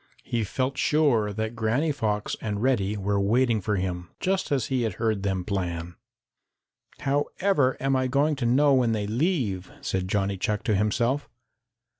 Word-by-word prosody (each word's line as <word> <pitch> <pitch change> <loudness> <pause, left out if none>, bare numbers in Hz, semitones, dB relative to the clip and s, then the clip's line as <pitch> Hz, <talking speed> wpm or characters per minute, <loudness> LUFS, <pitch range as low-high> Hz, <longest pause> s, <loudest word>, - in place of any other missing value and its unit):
He 115 -2 -1
felt 130 +6 -2
sure 135 -9 +2
that 110 +2 -3
Granny 120 +8 +1
Fox 105 -7 -1
and 105 0 -3
Reddy 105 -6 +1
were 100 0 0
waiting 115 +2 +2
for 105 +1 0
him, 90 -2 -3
just 190 -3 -1
as 135 -5 +1
he 130 -2 0
had 110 -4 -1
heard 110 -1 -1
them 95 -2 -1
plan. 90 -4 -3 1.1
"However 145 +1 +1
am 135 0 +1
I 130 0 +1
going 145 +4 +2
to 120 -3 0
know 140 +4 +4
when 125 -3 +3
they 105 -2 -1
leave?" 115 - -1
said 95 -1 -2
Johnny 100 0 0
Chuck 105 +2 -1
to 110 - +1
himself. 115 +7 0
110 Hz, 165 wpm, -26 LUFS, 100-135 Hz, 1.1 s, know